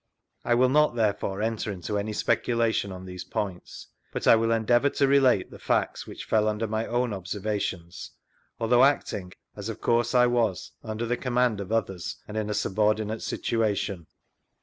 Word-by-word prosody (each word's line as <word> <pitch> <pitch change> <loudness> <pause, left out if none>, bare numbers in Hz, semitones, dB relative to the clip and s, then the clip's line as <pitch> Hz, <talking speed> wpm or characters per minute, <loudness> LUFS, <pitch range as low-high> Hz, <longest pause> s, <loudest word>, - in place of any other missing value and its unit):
I 120 - +2
will 125 +2 +4
not, 150 -2 +3
there 110 -3 +2
fore, 100 +1 -4
enter 110 -1 -2
into 95 +2 -4
any 105 +2 -3
speculation 115 -1 0
on 95 0 -8
these 90 -1 -7
points, 95 -4 -5 0.3
but - - -4
I - - +8
will 115 0 +1
endeavour 120 +4 +3
to 140 0 +1
relate 135 -7 +3
the - - -11
facts - - -1
which - - -8
fell 110 -1 +2
under 110 +1 0
my 110 +1 -2
own 120 -1 0
observations, 95 -2 -4 0.5
although 120 +2 +4
acting, 105 -9 +1 0.2
as 105 +1 -6
frf 115 - -6
course 120 +1 +1
I 125 0 +6
was, 115 -7 0
under 110 +2 -3
the 120 +1 -1
command 125 -4 +1
of 100 +1 -7
others, 95 -6 -2
and 105 - -8
in 110 -1 -2
a 105 - -1
subordinate 105 +2 0
situation. 100 -6 -1
110 Hz, 175 wpm, -26 LUFS, 100-120 Hz, 0.5 s, I